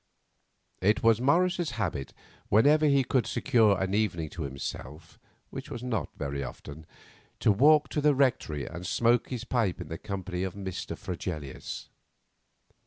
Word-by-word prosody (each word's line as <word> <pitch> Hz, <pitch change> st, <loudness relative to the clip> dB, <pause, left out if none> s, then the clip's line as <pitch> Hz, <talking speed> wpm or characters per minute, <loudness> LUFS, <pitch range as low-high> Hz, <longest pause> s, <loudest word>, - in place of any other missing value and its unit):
It 105 Hz, +4 st, +2 dB
was 115 Hz, 0 st, +4 dB
Morris's 175 Hz, +2 st, +2 dB
habit, 80 Hz, -10 st, -2 dB, 0.4 s
whenever 150 Hz, +9 st, +5 dB
he 140 Hz, -2 st, +4 dB
could 125 Hz, -2 st, +1 dB
secure 110 Hz, -5 st, +3 dB
an 95 Hz, 0 st, -1 dB
evening 90 Hz, -7 st, 0 dB
to 85 Hz, -, -7 dB
himself, 70 Hz, +3 st, -7 dB, 0.3 s
which -, -, -7 dB
was 120 Hz, -, -6 dB
not 125 Hz, -3 st, -2 dB
very 70 Hz, 0 st, -3 dB
often, 75 Hz, +3 st, -9 dB, 0.5 s
to -, -, +4 dB
walk 145 Hz, +7 st, +5 dB
to 150 Hz, -, -1 dB
the 150 Hz, -1 st, +4 dB
Rectory 115 Hz, -, +1 dB
and 85 Hz, -, -7 dB
smoke 120 Hz, +5 st, +2 dB
his 125 Hz, -3 st, -4 dB
pipe 120 Hz, -7 st, 0 dB
in -, -, -7 dB
the 80 Hz, -, -5 dB
company 95 Hz, -3 st, -4 dB
of 95 Hz, 0 st, -3 dB
Mr. 95 Hz, -2 st, -5 dB
Fregelius. 80 Hz, -6 st, -6 dB
105 Hz, 150 wpm, -28 LUFS, 85-125 Hz, 0.5 s, whenever